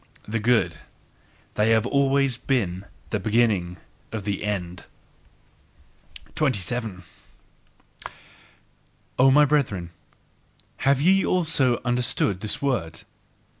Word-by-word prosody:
The 115 +2 -2
good 110 -7 +1 0.8
they 105 +1 +1
have 110 0 +3
always 135 -1 +2
been 100 -7 -2 0.2
the 105 - 0
beginning 105 -4 +1 0.3
of 110 -3 -5
the 100 -1 -3
end. 90 -4 -4 1.5
27. 115 - -2 2.2
O 130 +1 +6
my 150 +2 +6
brethren, 110 - -1 0.9
have 135 0 +2
ye 190 +6 +4
also 155 -9 +1
understood 120 -5 0
this 105 +6 -1
word? 115 - -2
115 Hz, 95 wpm, -24 LUFS, 100-135 Hz, 2.2 s, O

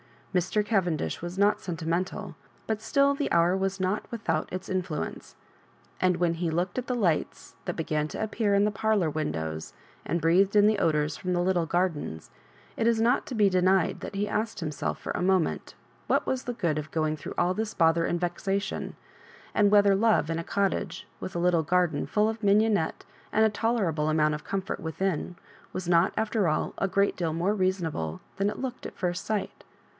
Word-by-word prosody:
Mr. 185 +4 +1
Cavendish 175 - 0
was 175 +2 -6
not 205 +1 +3
senti 165 -3 -5
mental, 175 +3 -2 0.3
but 220 -1 -2
still 280 +5 +3
the 280 0 -2
hour 170 +2 +4
was 195 0 -1
not 190 +3 -1
without 230 -2 -2
its 185 +1 -5
in 185 0 0
fluence; 165 -5 -6 0.6
and 185 -1 +2
when 170 -1 +1
he 170 0 -1
looked 175 +7 -1
at 250 - -6
the 250 - 0
lights 180 -9 -1
that - - -3
began 155 -2 -1
to 155 - -4
appear 215 -1 +1
in 200 - +4
the 210 - +2
parlour 210 -4 +1
windows, 80 - -3 0.3
and 170 - -1
breathed 185 +5 +3
in 205 0 +6
the 215 0 +3
odours 150 -2 +1
from 180 0 -2
the 175 - +1
little 175 -2 +1
gardens, 165 - -2 0.5
it 225 - +1
is 230 -1 +3
not 240 +3 +2
to 255 - -5
be 205 -2 +4
denied 185 -1 +2
that - - -7
he 205 +1 0
asked 215 -1 -2
himself 155 -3 -3
for - - -5
a - - -2
moment 185 -2 +1 0.3
what - - +2
was 260 -1 -2
the 245 - -2
good 170 -9 0
of 155 0 -6
going 155 -1 0
through 145 - -7
all 175 +1 +2
this 220 +2 -3
bother 165 0 +3
and 175 - 0
vexation, 195 +3 -2 0.6
and 205 -1 +4
whether 205 -1 +5
love 215 -4 +3
in 165 - -1
a - - -3
cottage, 200 +2 -1
with 185 - -6
a - - 0
little 175 -1 +3
garden 170 -2 +1
full 210 +1 +2
of 225 0 -5
mignonette 205 -4 +2 0.3
and 220 +1 +5
a 220 - +3
t<derable 200 -9 0
amount 155 -1 +2
of 150 - -6
comfort 195 -1 -3
within, 175 +1 -2 0.4
was 185 -2 -4
not, 170 +1 +4
after 220 -3 +1
all, 155 - 0
a 195 - +1
great 200 +1 +2
deal 165 -3 -1
more 175 +5 +1
reasonable 175 - -1 0.2
than 200 +1 +1
it - - -5
looked 255 -1 -5
at - - -13
first 180 -1 -2
sight? 215 -3 -3
185 Hz, 200 wpm, -27 LUFS, 165-210 Hz, 0.6 s, in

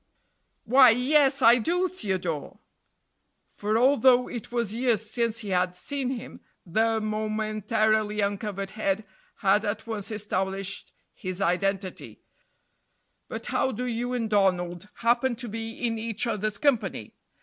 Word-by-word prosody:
Why, 255 +2 +7
yes 270 +4 +3
I 235 +2 +7
do, 355 +9 +1
Theodore 185 - -4 0.9
for 210 +2 -1
although 250 0 +4
it 240 -2 -7
was 235 -4 0
years 230 -2 +1
since 230 0 0
he 210 - -6
had 180 -1 +1
seen 270 +7 -3
him, 255 -3 -6 0.2
the 220 +5 +1
momentarily 215 0 0
uncovered 200 -1 -2
head 215 -1 -1 0.3
had 205 +1 +2
at 210 0 -3
once 220 -4 -4
established 195 -2 -2 0.2
his 185 -1 -6
identity; 195 +1 -2 1.0
"but - - -6
how 265 - 0
do 250 +2 -4
you 245 +1 -2
and 235 -3 -1
Donald 185 -3 0 0.2
happen 240 +1 +3
to 240 +1 -6
be 225 +1 -5
in 225 -1 -1
each 225 +1 -2
other's 215 -2 -1
company? 215 - 0
220 Hz, 130 wpm, -26 LUFS, 200-240 Hz, 1.0 s, Why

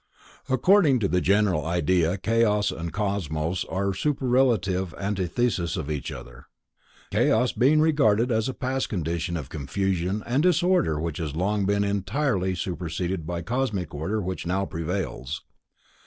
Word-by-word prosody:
According 145 +2 +4
to 100 - +2
the 90 -1 +1
general 100 -5 +2
idea 85 +2 +1
Chaos 105 0 +2
and 85 +1 -5
Cosmos 90 -5 -2
are 100 +1 -1
superlative 115 - +1
antitheses 95 -1 -1
of 75 0 -4
each 75 -3 -3
other. - - -10 0.6
Chaos 125 +3 +3
being 145 +5 +3
regarded 135 -7 +3
as 110 +1 +1
a - - -5
past 130 +1 -2
condition 85 -2 -2
of 70 -5 -7
confusion 90 +6 -2
and 125 +4 +1
disorder 175 - +2
which 80 +1 -3
has 75 -3 -4
long 100 +5 0
since 95 - 0
been 100 0 +2
entirely 100 -1 0
superseded 85 -1 -3
by 85 0 -3
cosmic 110 - -2
order 80 +9 -2
which 90 -1 -4
now 95 +2 0
prevails. 85 -5 -4
95 Hz, 140 wpm, -25 LUFS, 85-115 Hz, 0.6 s, According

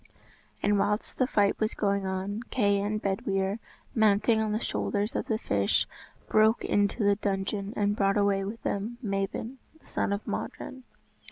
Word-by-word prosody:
] - - -31
And 205 0 +3
whilst 210 +2 -1
the 255 - +3
fight 205 -5 +2
was 215 0 0
going 200 -2 0
on, 190 +3 -2
Kay 200 -5 +2
and 210 +1 -1
Bedwyr, 195 +1 -1 0.3
mounting 220 0 +4
on 215 -1 0
the 215 - 0
shoulders 210 +1 -1
of - - -1
the 220 - +1
fish, 100 - +1 0.4
broke 220 +1 +4
into 205 +2 +1
the 200 0 +4
dungeon, 200 0 -2
and 205 0 +1
brought 195 0 +2
away 200 -1 +2
with 210 +3 -6
them 215 +4 -2
Mabon, 200 +5 -2 0.2
the - - -27
son - - -1
of 200 +1 -2
Modron. 260 -1 -5
205 Hz, 170 wpm, -28 LUFS, 195-215 Hz, 0.4 s, mounting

